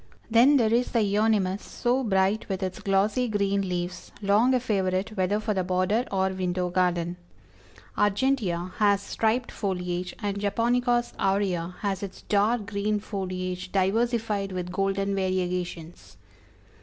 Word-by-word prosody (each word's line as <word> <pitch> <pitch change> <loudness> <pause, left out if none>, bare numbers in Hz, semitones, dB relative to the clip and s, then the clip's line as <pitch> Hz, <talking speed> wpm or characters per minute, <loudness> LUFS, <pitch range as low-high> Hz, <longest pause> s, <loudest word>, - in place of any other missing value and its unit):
Then 250 +6 +6
there 225 -3 +2
is 245 +1 +1
the 230 -3 +3
Euonymus, 205 -2 +1
so 250 +2 -1
bright 195 0 +1
with 190 0 -2
its 185 -1 -3
glossy 205 +6 +1
green 200 -2 +1
leaves, 180 0 -4
long 215 +6 +3
a - - +3
favorite 195 -3 -1
whether 195 +2 +1
for 215 0 -1
the 190 -2 0
border 185 +6 +1
or 190 -1 +1
window 180 -1 -2
garden. 175 -1 0 0.8
Argentea 205 -5 +1
has 205 -2 +4
striped 230 +4 0
foliage, 180 -3 -3
and 200 -2 -2
Japonicas 240 +4 +1
aurea 190 -3 0
has 195 -3 -1
its 200 -2 -7
dark 210 +2 +1
green 210 0 -1
foliage 185 -2 -4
diversified 210 0 0
with 180 -1 -4
golden 195 +1 0
variegations. 180 -3 -3
195 Hz, 135 wpm, -26 LUFS, 185-220 Hz, 0.8 s, Then